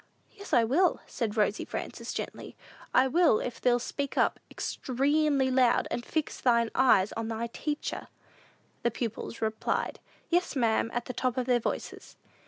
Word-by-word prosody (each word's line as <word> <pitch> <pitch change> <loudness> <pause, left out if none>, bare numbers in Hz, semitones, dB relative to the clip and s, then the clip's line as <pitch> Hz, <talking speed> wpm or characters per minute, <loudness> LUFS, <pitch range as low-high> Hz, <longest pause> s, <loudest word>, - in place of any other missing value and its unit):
"Yes, 400 -2 -11
I 245 -6 +5
will," 305 +11 +3
said 225 -3 -3
Rosy 210 0 +2
Frances, - - -5
gently; - - -6 0.4
"I 260 +1 +5
will, 315 -5 +4
if 245 - -4
thee'll 245 -1 +4
speak 280 +3 -4
up - - +2 0.2
'xtremely 275 0 +1
loud, 250 -2 +4
and 240 - -2
fix 310 +4 -3
thine 235 -2 +3
eyes 215 -7 +4
on 225 0 -4
thy 225 +1 -2
teacher." 295 +5 -4 0.7
The 235 - +2
pupils 230 -1 -4
replied, 220 0 -1 0.3
"Yes, 350 -2 +1
ma'am," 230 -3 +2
at 240 0 -3
the 250 - -5
top 255 0 -1
of 255 - 0
their 245 -1 +3
voices. - - -5
250 Hz, 160 wpm, -29 LUFS, 230-280 Hz, 0.7 s, I